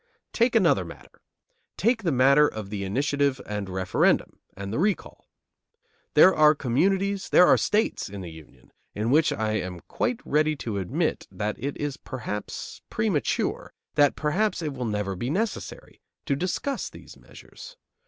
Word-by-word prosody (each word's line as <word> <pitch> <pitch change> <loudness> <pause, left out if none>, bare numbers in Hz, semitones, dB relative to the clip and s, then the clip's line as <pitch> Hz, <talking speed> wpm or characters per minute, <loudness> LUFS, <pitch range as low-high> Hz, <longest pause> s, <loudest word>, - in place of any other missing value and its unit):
Take 235 0 +2
another 170 - +4
matter. 85 - -13 0.6
Take 230 +3 +2
the 175 -5 0
matter 140 +3 +5
of 105 -5 -7
the 100 -2 -3
initiative 140 +6 0
and 105 -2 -4
referendum, 95 0 +1 0.2
and 100 +1 -5
the - - -1
recall. 200 +2 -2 0.9
There 190 - +8
are 155 0 +5
communities, 190 +10 0
there 180 - +7
are - - +6
states 215 - 0
in 100 0 -7
the 85 -3 -7
Union, 80 -2 -16 0.2
in 110 +3 -1
which 155 +3 +4
I 110 -1 -1
am 90 -1 -6
quite 245 -1 -2
ready 155 +1 +2
to 110 -7 -4
admit 90 -2 -2
that 105 0 -3
it 140 +1 -3
is 145 -2 -3
perhaps 105 -5 -6
premature, - - -1 0.2
that 145 -1 +4
perhaps 180 +5 0
it 150 -2 -3
will 125 -2 -4
never 105 -3 -2
be 120 +8 -3
necessary, 205 +8 -4 0.2
to 140 - +1
discuss 185 - -2
these - - -13
measures. - - -14
140 Hz, 155 wpm, -26 LUFS, -, 0.9 s, There